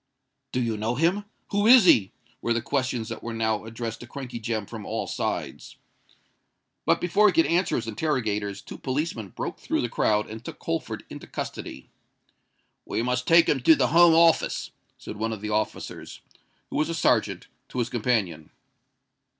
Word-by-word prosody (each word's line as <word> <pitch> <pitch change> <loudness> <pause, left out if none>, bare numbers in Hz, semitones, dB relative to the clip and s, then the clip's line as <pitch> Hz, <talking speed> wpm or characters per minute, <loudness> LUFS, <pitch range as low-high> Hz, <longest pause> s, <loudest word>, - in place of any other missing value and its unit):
"Do 125 - -1
you 115 -3 -1
know 110 +3 -1
him?" 175 +8 +1 0.3
"Who 205 +1 +2
is 245 -4 +8
he?" 100 - +5 0.3
were 120 - +1
the 115 - 0
questions 125 -5 -1
that 115 - -6
were 115 0 -5
now 110 -1 0
addressed 115 0 -5
to 120 - -10
Crankey 125 -2 -7
Jem 110 -2 -2
from 110 0 -8
all - - -3
sides. - - -4 1.1
But - - +4
before 200 +4 +4
he 195 - +3
could 165 - +4
answer 175 +1 +1
his 115 - -2
interrogators, 105 -5 -2
two - - -10
policemen 130 - -3
broke - - -5
through - - -1
the 120 - -2
crowd, 105 -2 +1
and 110 +1 -9
took - - -8
Holford - - -3
into - - -9
custody. - - -7 0.9
"We 115 - -2
must 125 +1 -1
take 165 0 +6
him 140 - +2
to 160 +6 +6
the 125 -4 +1
Home 170 +1 +6
Office," 165 0 +3 0.3
said 105 - -8
one 110 +1 -2
of 105 - -7
the 105 0 -4
officers, 105 0 -3 0.5
who - - -2
was 155 +2 +1
a 165 - -2
serjeant, - - +1 0.2
to - - -8
his 120 - 0
companion. 105 -10 -1
120 Hz, 180 wpm, -26 LUFS, 110-160 Hz, 1.1 s, is